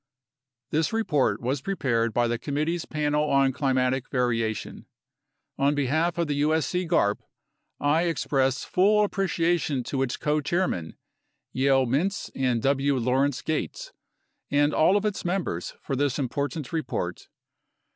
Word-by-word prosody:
This 160 Hz, +1 st, +1 dB
report 195 Hz, -, +1 dB
was 130 Hz, +3 st, -1 dB
prepared 120 Hz, -11 st, 0 dB
by 120 Hz, +2 st, +1 dB
the 120 Hz, 0 st, -1 dB
Committee's 155 Hz, +5 st, -2 dB
Panel 150 Hz, -1 st, 0 dB
on 135 Hz, -1 st, +3 dB
Climatic 130 Hz, -1 st, 0 dB
Variation. 115 Hz, -4 st, -2 dB, 0.7 s
On 140 Hz, +2 st, +3 dB
behalf 155 Hz, +5 st, 0 dB
of 170 Hz, -, +1 dB
the 145 Hz, -2 st, -1 dB
usc 160 Hz, +4 st, +1 dB
garp, 105 Hz, -, +2 dB, 0.6 s
I 155 Hz, +4 st, +2 dB
express 135 Hz, -5 st, 0 dB
full 210 Hz, +3 st, +3 dB
appreciation 170 Hz, -8 st, 0 dB
to 135 Hz, +2 st, -2 dB
its 130 Hz, -2 st, -1 dB
Co 150 Hz, 0 st, 0 dB
Chairmen, 150 Hz, -, -1 dB, 0.6 s
Yale 135 Hz, 0 st, +3 dB
Mintz 160 Hz, +11 st, -1 dB
and 125 Hz, -4 st, 0 dB
W. 140 Hz, 0 st, +2 dB
Lawrence 130 Hz, +3 st, +1 dB
Gates, -, -, -3 dB, 0.6 s
and 145 Hz, +1 st, +2 dB
all 185 Hz, +6 st, +4 dB
of 205 Hz, -, -2 dB
its 210 Hz, -2 st, -2 dB
mem 180 Hz, +1 st, 0 dB
bers 85 Hz, -, -5 dB
for 135 Hz, -, -2 dB
this 140 Hz, -1 st, 0 dB
important 140 Hz, +2 st, -3 dB
report. 125 Hz, -, -3 dB
145 Hz, 135 wpm, -26 LUFS, 130-165 Hz, 0.7 s, all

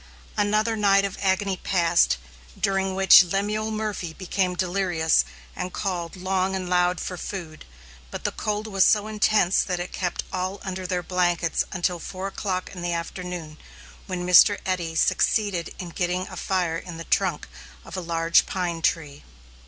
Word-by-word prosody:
Another 215 Hz, +2 st, +1 dB
night 200 Hz, -2 st, +4 dB
of 195 Hz, -, -5 dB
agony 190 Hz, 0 st, +1 dB
passed, 170 Hz, -, +2 dB, 0.4 s
during 195 Hz, -1 st, 0 dB
which 190 Hz, 0 st, +8 dB
Lemuel 205 Hz, +4 st, -1 dB
Murphy 215 Hz, -6 st, -3 dB
became 185 Hz, 0 st, -1 dB
delirious 180 Hz, -3 st, +1 dB, 0.3 s
and 180 Hz, 0 st, -4 dB
called 180 Hz, -4 st, -3 dB
long 190 Hz, +1 st, -1 dB
and 185 Hz, -1 st, -3 dB
loud 180 Hz, 0 st, +2 dB
for 180 Hz, -, -5 dB
food; 170 Hz, -5 st, -7 dB, 0.4 s
but -, -, -7 dB
the -, -, 0 dB
cold 210 Hz, 0 st, -3 dB
was 195 Hz, -3 st, +2 dB
so 210 Hz, +1 st, +4 dB
intense 215 Hz, -3 st, +2 dB
that 180 Hz, -2 st, -2 dB
it 175 Hz, -, -5 dB
kept 180 Hz, -2 st, -2 dB
all 185 Hz, +2 st, -2 dB
under 185 Hz, -1 st, -4 dB
their 180 Hz, -1 st, -1 dB
blankets 175 Hz, -2 st, +1 dB
until 180 Hz, -2 st, -1 dB
four 185 Hz, +3 st, -6 dB
o'clock 190 Hz, -1 st, -3 dB
in 180 Hz, -, -7 dB
the 175 Hz, 0 st, -1 dB
afternoon, 170 Hz, -2 st, -5 dB, 0.5 s
when 180 Hz, -2 st, -3 dB
Mr. 180 Hz, +3 st, +7 dB
Eddy 175 Hz, -3 st, -2 dB
succeeded 190 Hz, +1 st, +1 dB
in 180 Hz, -, -6 dB
getting 180 Hz, +2 st, -1 dB
a 185 Hz, -, -8 dB
fire 175 Hz, -2 st, -1 dB
in 170 Hz, -2 st, -9 dB
the 165 Hz, -, -6 dB
trunk 180 Hz, -3 st, 0 dB, 0.4 s
of 170 Hz, -, -9 dB
a 185 Hz, -, -3 dB
large 165 Hz, -1 st, +2 dB
pine 175 Hz, -3 st, -2 dB
tree. 150 Hz, -3 st, -1 dB
185 Hz, 160 wpm, -24 LUFS, 175-195 Hz, 0.5 s, which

